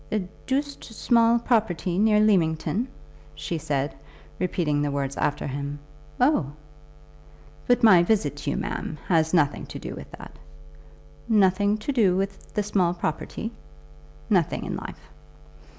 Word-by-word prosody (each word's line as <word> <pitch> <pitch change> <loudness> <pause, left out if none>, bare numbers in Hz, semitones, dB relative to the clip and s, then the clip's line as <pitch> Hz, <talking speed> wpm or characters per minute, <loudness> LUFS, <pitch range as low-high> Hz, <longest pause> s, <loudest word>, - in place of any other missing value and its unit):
"A 205 -4 -1 0.2
doosed 285 +2 -2
small 230 +1 +3
property 210 -7 0
near 210 0 +4
Leamington," 195 +2 +2 0.5
she 165 - -4
said, 145 -2 -1 0.5
repeating 165 -5 0
the 145 - 0
words 140 -1 -2
after 145 - -1
him. 140 +1 -4 0.4
"Oh!" 245 - +2 1.1
"But 245 0 +3
my 190 -6 +8
visit 210 +4 +1
to - - -4
you, - - -1
ma'am, - - -4
has 160 -3 +3
nothing 150 -5 +1
to - - -7
do - - -6
with - - -9
that." - - -11 0.9
"Nothing 205 -1 +3
to 215 +7 -3
do 205 -9 +3
with 195 0 -4
the 210 - +1
small 185 -4 +1
property." 175 +6 -4 0.8
"Nothing 185 -7 +1
in - - -3
life." - - -9
190 Hz, 135 wpm, -25 LUFS, 160-220 Hz, 1.1 s, my